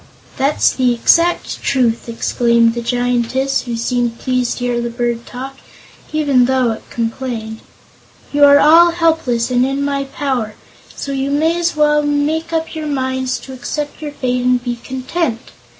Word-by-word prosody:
"That's 275 +3 +2
the 250 -2 +1
exact 335 +8 +2
truth!" 235 -3 0
exclaimed 235 0 +2
the 235 - -4
Giantess, 245 +2 0
who 240 -2 -3
seemed 240 0 -1
pleased 255 -2 -1
to 245 - -5
hear 240 -1 0
the 235 - -3
bird 235 0 -3
talk, 265 +2 -7 0.5
even 285 -5 +3
though 255 -2 +1
it 220 - -8
complained; 225 -1 -4 0.7
"you 290 0 +3
are 285 0 +8
all 330 +4 +6
helpless 320 -9 +1
and 250 0 +3
in 275 +2 -1
my 280 -1 -1
power, 260 -6 -3 0.4
so 280 - -5
you 270 0 -2
may 315 +4 +1
as 345 -1 0
well 300 0 +3
make 295 +3 -1
up 325 0 -2
your 310 -2 -5
minds 260 -2 -1
to 265 - -10
accept 290 +4 -5
your 300 -1 -5
fate 250 -3 -1
and 250 -1 +2
be 240 -1 -3
content. 260 -1 -3
260 Hz, 165 wpm, -17 LUFS, 240-290 Hz, 0.7 s, are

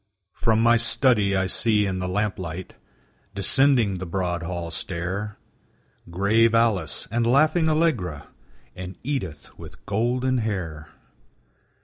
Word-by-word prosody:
From 110 0 +1
my 120 +1 +5
study 115 -4 +2
I 95 0 +1
see 105 +2 +2
in 95 -1 -2
the 90 - -3
lamplight, 95 -3 -3 0.6
Descending 115 -2 +3
the 95 - -6
broad 90 -1 -2
hall 85 -1 -5
stair, 100 +2 -4 0.7
Grave 110 +6 +2
Alice, 110 -8 +1
and 115 +1 0
laughing 155 +6 +3
Allegra, 125 - 0 0.5
And 90 0 -8
Edith 95 - -5
with - - -13
golden 125 +5 0
hair. 90 -9 -4
100 Hz, 115 wpm, -24 LUFS, 90-120 Hz, 0.7 s, my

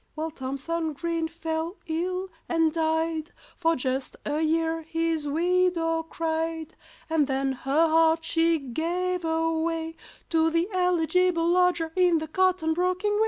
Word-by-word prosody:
Well, 315 +1 -3
THOMSON 310 +4 -3
GREEN 335 +2 -2
fell 325 +2 -4
ill 365 +4 -2 0.2
and 325 -2 +2
died; 320 0 -1 0.2
For 330 -1 +1
just 260 0 -3
a 295 +1 -1
year 325 +1 +1
his 325 -1 -1
widow 335 +1 +1
cried, 325 0 -3 0.3
And 320 -3 +2
then 270 0 0
her 275 +5 +1
heart 325 0 +3
she 330 0 +2
gave 345 +7 -2
away 325 0 -1 0.3
To 325 -1 +3
the 335 +2 +1
eligible 360 -1 +2
lodger 350 -2 +2
in 360 -2 +4
the 315 0 -3
cotton 365 -1 +2
broking 365 +4 0
way. 415 - +1
325 Hz, 135 wpm, -26 LUFS, 320-340 Hz, 0.3 s, in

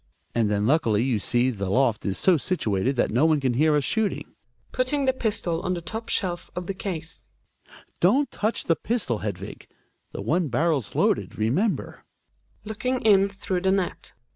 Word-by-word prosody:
And 115 -3 +1
then 105 0 0
luckily 115 -6 +2
you 125 -5 0
see 120 +5 +1
the 100 -5 -4
loft 115 0 +1
is 95 - -1
so 185 - +4
situated 135 - -1
that 120 - +1
no 120 +7 +2
one 155 -2 +3
can 130 -3 0
hear 150 +5 +3
us 145 - +2
shooting. 220 - -1 0.4
{Putting 270 +2 0
the 260 - +3
pistol 205 -9 -1
(/fi 185 - -1
ike 170 - -8
top 225 +6 -5
shelf 180 -3 0
of 180 - -4
the 195 - -3
case) 170 -4 -6 0.7
Don't 255 +11 +3
touch 215 +2 -1
the 165 - +2
pistol, 200 - -2
Hedvig! 100 -2 -6 0.4
The - - -6
one 170 +1 +1
barrel's 140 -2 0
wloaded, - - +1
remen>ber. 140 - 0 0.7
Gregers - - -29
{looking 250 +4 -2
in 200 -2 +5
through 190 -2 -3
the 190 - +1
net). 190 -2 -2
165 Hz, 180 wpm, -25 LUFS, 120-200 Hz, 0.7 s, in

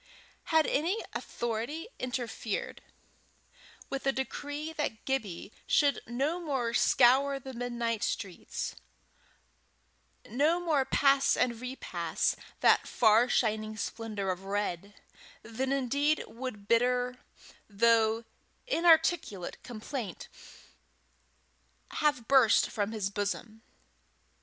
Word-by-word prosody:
Had 320 -1 +3
any 345 +10 0
authority 240 - -4
interfered, 245 -4 -4 1.1
with 275 0 -4
a - - +5
decree 290 +4 -4
that 295 -8 -3
Gibbie 215 -8 -3 0.2
should 285 -2 +3
no 275 +9 -1
more 265 -8 -2
scour 270 +4 +4
the 265 0 -9
midnight 235 -2 -2
streets, 185 -3 -3 1.5
no 295 +9 +2
more 310 -6 +1
pass 275 0 +3
and 240 -2 0
repass 255 +1 -2 0.3
that - - +4
far 225 +2 +4
shining 215 -2 0
splendour 210 -1 -3
of 185 +1 -6
red, 200 -1 -3 0.5
then 255 +4 -3
indeed 280 +3 +1
would 230 -4 -7
bitter, 250 +2 +2 0.5
though 225 +1 +3 0.4
inarticulate, 330 - +2
complaint 240 -1 -6 1.6
have 290 -6 0
burst 265 -5 +5
from 205 0 -1
his 205 -3 -2
bosom. 210 +2 -3
245 Hz, 95 wpm, -30 LUFS, 220-275 Hz, 1.6 s, a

